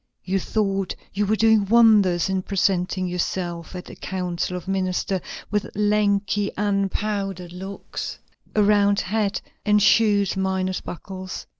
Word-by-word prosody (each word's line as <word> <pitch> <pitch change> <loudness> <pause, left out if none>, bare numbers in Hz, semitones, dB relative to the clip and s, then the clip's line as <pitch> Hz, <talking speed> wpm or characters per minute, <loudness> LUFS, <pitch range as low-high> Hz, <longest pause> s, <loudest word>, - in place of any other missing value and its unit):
You 195 +1 0
thought 195 -2 -1 0.2
you 205 +1 0
were 215 - +3
doing 220 -2 +4
wonders 210 -6 +5
in 190 -1 0
presenting 185 -1 0
yourself 175 -1 -3
at 180 - -6
the - - -10
council 180 -1 -3
of 180 - -9
ministers 190 0 -1 0.3
with 210 -1 -1
lanky, 205 -1 +1
unpowdered 195 -2 -1
locks, 190 +2 -6 0.4
a 210 - +4
round 205 -1 +4
hat, 205 +1 -1 0.2
and 210 0 +4
shoes 205 -1 +4
minus 190 -1 -1
buckles. 185 +2 -7
195 Hz, 130 wpm, -23 LUFS, 185-205 Hz, 0.4 s, wonders